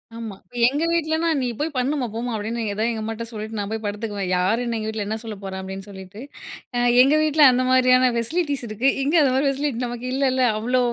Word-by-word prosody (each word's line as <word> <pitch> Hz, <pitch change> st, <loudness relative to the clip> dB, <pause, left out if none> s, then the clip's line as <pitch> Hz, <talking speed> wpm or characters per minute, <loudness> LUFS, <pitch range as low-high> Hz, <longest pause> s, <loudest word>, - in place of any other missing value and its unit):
ஆமா. 225 Hz, -4 st, -6 dB, 0.3 s
எங்க 290 Hz, +5 st, 0 dB
வீட்லன்னா 330 Hz, 0 st, 0 dB
நீ 255 Hz, -, -1 dB
போய் 310 Hz, +2 st, 0 dB
பண்ணுமா, 260 Hz, +1 st, 0 dB
போம்மா 235 Hz, +2 st, -4 dB
அப்டின்னு 225 Hz, +3 st, -3 dB
ஏதா 215 Hz, -, -2 dB
எங்க 220 Hz, -1 st, -4 dB
அம்மாட்ட 225 Hz, +1 st, -4 dB
சொல்லிட்டு 215 Hz, 0 st, -6 dB
நான் 205 Hz, 0 st, -3 dB
போய் 220 Hz, 0 st, -3 dB
படுத்துக்குவேன். 205 Hz, -2 st, -3 dB
யார் 190 Hz, +6 st, +1 dB
என்ன 235 Hz, -1 st, -2 dB
எங்க 215 Hz, 0 st, -4 dB
வீட்ல 220 Hz, -2 st, -3 dB
என்ன 220 Hz, +1 st, -2 dB
சொல்ல 220 Hz, -2 st, -6 dB
போறா? 190 Hz, -1 st, -6 dB
அப்டின்னு 190 Hz, +1 st, -7 dB
சொல்லிட்டு, 190 Hz, +1 st, -11 dB, 0.6 s
அ -, -, 0 dB, 0.2 s
எங்க 275 Hz, +4 st, +5 dB
வீட்ல 310 Hz, 0 st, +2 dB
அந்த 255 Hz, +1 st, +1 dB
மாரியான 255 Hz, 0 st, +4 dB
பெசிலிட்டிஸ் 285 Hz, +2 st, -1 dB
இருக்கு. 220 Hz, +6 st, +1 dB
இங்க 295 Hz, +5 st, +1 dB
அது 270 Hz, -3 st, +3 dB
மாரி 270 Hz, +2 st, +1 dB
பெசிலிட்டி 275 Hz, -3 st, -2 dB
நமக்கு 240 Hz, +1 st, -6 dB
இல்லல. 265 Hz, -1 st, +1 dB, 0.2 s
அவ்ளோ 250 Hz, +4 st, 0 dB
235 Hz, 210 wpm, -22 LUFS, 215-270 Hz, 0.6 s, எங்க